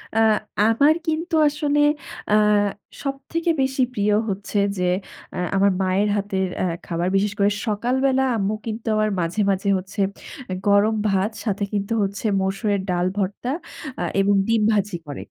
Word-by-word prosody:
আ - - +1 0.4
আমার 225 +8 +5
কিন্তু 325 +2 -1
আসলে 295 0 0 0.5
আ - - +4 0.7
সবথেকে 280 +5 -3
বেশি 265 0 0
প্রিয় 205 -2 +1 0.2
হচ্ছে 200 +1 -3 0.2
যে, 180 - -1 0.5
আ - - -5 0.2
আমার 200 0 +4
মায়ের 190 +3 +1
হাতের 195 -2 -1 0.2
আ - - +2 0.2
খাবার। 170 0 -2
বিশেষ 200 +1 +1
করে 200 +1 +4 0.2
সকালবেলা 260 +5 +1
আম্মু 200 +1 0
কিন্তু 225 +1 -5
আমার 215 0 +2
মাঝে, 170 +4 -2
মাঝে 195 +1 -1
হচ্ছে 190 +2 -8 0.7
গরম 205 +2 +4
ভাত 195 +3 +1
সাথে 200 -1 -1
কিন্তু 200 +2 -1
হচ্ছে, 200 +3 -4 0.2
মসুরের 195 +1 0
ডাল 180 0 +1
ভর্তা, 200 +6 -2 0.5
আ - - 0 0.2
এবং 200 +1 +3
ডিম 225 -1 +2
ভাজি 205 -2 0
করে। 145 - -6
205 Hz, 150 wpm, -22 LUFS, 195-240 Hz, 0.7 s, আমার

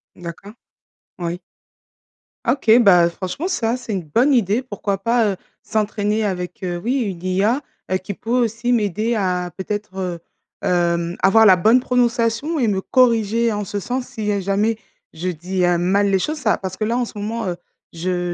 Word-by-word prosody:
D'accord. 180 +4 -9 0.7
Oui. 175 0 -3 1.1
Ah - - +4
OK. 250 -5 +1
Bah, 185 -7 +6
heu, 170 - +2
franchement, 185 - -4
ça, 230 -9 0
c'est 250 -3 -7
une 190 -4 -2
bonne 235 - +2
idée. 225 0 +2
Pourquoi 205 -4 -3
pas, 230 +1 +2
heu, - - -6 0.3
s'entraîner 215 0 -1
avec, 180 -2 -4
heu, 175 -1 -2
oui 255 +6 0
une 190 -6 -4
IA, 200 +9 +1 0.3
heu, 185 - +3
qui 185 +2 -6
peut 225 - -11
aussi 240 0 +1
m'aider 215 +1 +1
à 180 -3 -1
peut-être 205 0 -5
heu, 180 -2 -3 0.4
hem, 170 -1 0
avoir 220 +3 +6
la 185 -3 +7
bonne 225 +8 +4
prononciation 245 +4 +1
et 245 - +2
me 195 -2 0
corriger 230 -1 +2
en 205 -1 -2
ce 205 +2 -3
sens, 250 +4 -3
si, 210 -1 -3
heu, 200 - 0
jamais 200 +4 0 0.3
je 170 +3 -5
dis, 180 +2 -1
heu, 175 0 +3
mal 195 +4 +2
les 195 - +2
choses. 305 +10 -2
Ça 225 -7 +1
parce 190 -1 -6
que 215 - -1
là 235 +2 0
en 250 - +1
ce 225 - -8
moment, 220 +2 -3
heu, 175 - -4 0.3
je 175 +1 -2
205 Hz, 190 wpm, -20 LUFS, 180-230 Hz, 1.1 s, la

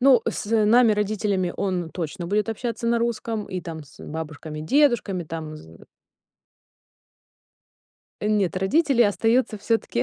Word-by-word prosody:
ну 255 -3 +6
с - - -3 0.2
нами 230 +1 +5
родителями 205 -3 0
он 180 -4 -2
точно 175 +1 -5
будет 210 +4 0
общаться 235 +1 -3
на 235 0 +3
русском 230 -2 -2
и 185 -2 -4
там 160 -3 -7
с 140 - -18
бабушками, 155 -1 -6
дедушками, 210 - +2
там 155 -1 -6
з 80 - -14 2.4
Нет, 210 -4 +1
родители 250 - +3
остаются 225 +1 +2
всё-таки, 225 - 0
205 Hz, 125 wpm, -24 LUFS, 170-230 Hz, 2.4 s, ну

